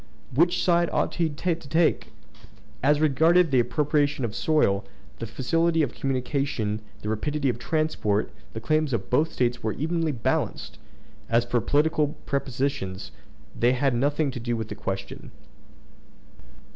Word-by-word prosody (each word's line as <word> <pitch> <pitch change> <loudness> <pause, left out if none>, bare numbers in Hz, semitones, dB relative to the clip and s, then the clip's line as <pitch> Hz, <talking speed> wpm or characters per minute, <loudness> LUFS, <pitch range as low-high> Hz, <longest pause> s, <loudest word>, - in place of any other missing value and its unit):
Which 175 +6 +3
side 170 -1 +3
ought - - 0
he 165 -2 0
to 165 +3 -1
take? 160 +1 0 0.7
As 145 +2 +3
regarded 160 +3 +4
the 130 - +4
appropriation 145 +1 +1
of 115 - -3
the - - -12
soil, 125 -11 +2 0.4
the 115 - -4
facility 165 +8 +1
of 130 - -2
communication, 130 -5 -2 0.2
the 105 - -3
rapidity 140 +6 -1
of 120 - -2
transport, 125 -8 0 0.2
the 110 - -4
claims 155 +3 0
of 100 -4 -3
both 155 +6 +2
States 120 -1 0
were 110 -1 -1
evenly 160 +2 -1
balanced. 120 -6 -2 0.5
As 115 +1 +3
for 120 0 0
political 150 +1 +1
prepossessions, 130 -8 -2 0.4
they 120 +2 +3
had 135 +1 +1
nothing 145 +4 +1
to 125 - -6
do 120 0 -2
with 110 -1 -5
the - - -4
question. 100 -2 -5
140 Hz, 145 wpm, -25 LUFS, 120-155 Hz, 0.7 s, regarded